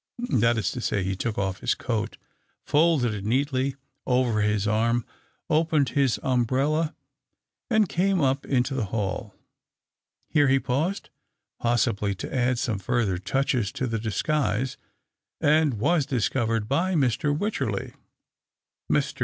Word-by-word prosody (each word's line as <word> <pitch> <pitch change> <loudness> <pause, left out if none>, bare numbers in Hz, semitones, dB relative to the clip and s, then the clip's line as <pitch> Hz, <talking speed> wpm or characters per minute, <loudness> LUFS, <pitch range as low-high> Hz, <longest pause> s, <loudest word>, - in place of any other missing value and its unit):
That 115 -1 +3
is 105 -5 0
to 125 - -5
say, 100 -4 0
he 95 +1 -1
took 110 +3 -3
off 95 -1 -1
his - - 0
coat, 115 -4 -3 0.5
folded 145 -6 +3
it 100 -2 -5
neatly 130 +3 0 0.3
over 125 -4 +2
his 105 -1 +1
arm, 115 +2 +1 0.4
opened 155 -4 +2
his 135 -2 +1
umbrella, 135 +6 +1 0.7
and 220 -4 +3
came 190 +2 +1
up 135 -2 +1
into 130 0 0
the 130 -5 -1
hall. 100 -1 -3 0.9
Here 145 -3 +3
he 135 0 +4
paused, 155 +11 -2 0.5
possibly 105 -4 +1
to 95 - -7
add 125 0 +2
some 115 -4 -1
further 100 -3 0
touches 115 +2 0
to 130 - -2
the 115 -2 -2
disguise, 125 +2 -1 0.6
and 150 -3 +3
was 145 +7 +1
discovered 115 -3 0
by 175 +8 +1
Mr. 145 +1 +1
Wycherley. 140 - -2 1.0
Mr. - - 0
125 Hz, 135 wpm, -26 LUFS, 110-145 Hz, 1.0 s, he